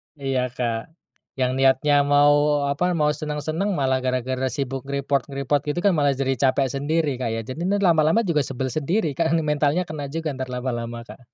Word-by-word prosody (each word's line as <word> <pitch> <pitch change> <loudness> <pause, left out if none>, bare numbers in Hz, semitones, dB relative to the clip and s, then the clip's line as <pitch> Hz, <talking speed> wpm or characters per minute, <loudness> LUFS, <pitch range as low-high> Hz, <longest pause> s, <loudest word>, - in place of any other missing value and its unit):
Iya, 135 -3 -1
Kak. 120 +4 -4 0.4
Yang 130 -1 0
niatnya 135 +2 +4
mau 145 0 +4
apa, 180 +5 0
mau 150 -1 +2
senang-senang, 155 +6 -2
malah 130 -3 +1
gara-gara 130 0 -1
sibuk 135 -1 -4
nge-report-nge-report 140 0 -1
gitu 150 +4 -1
kan 200 - +5
malah 145 -4 +2
jadi 135 0 -1
capek 135 -1 +2
sendiri 145 -1 -1
Kak, 125 - -1
ya. 115 - -2
Jadi, 155 +10 -4
nih 200 +1 +1
lama-lama 165 +5 +4
juga 170 -6 +1
sebel 130 -1 -3
sendiri, 155 - 0
Kak, 165 +3 0
mentalnya 150 +3 +1
kena 155 -4 -6
juga, 160 +1 -3
entar 130 -1 -5
lama-lama, 120 -2 -4
Kak. - - -13
140 Hz, 175 wpm, -23 LUFS, 130-155 Hz, 0.4 s, kan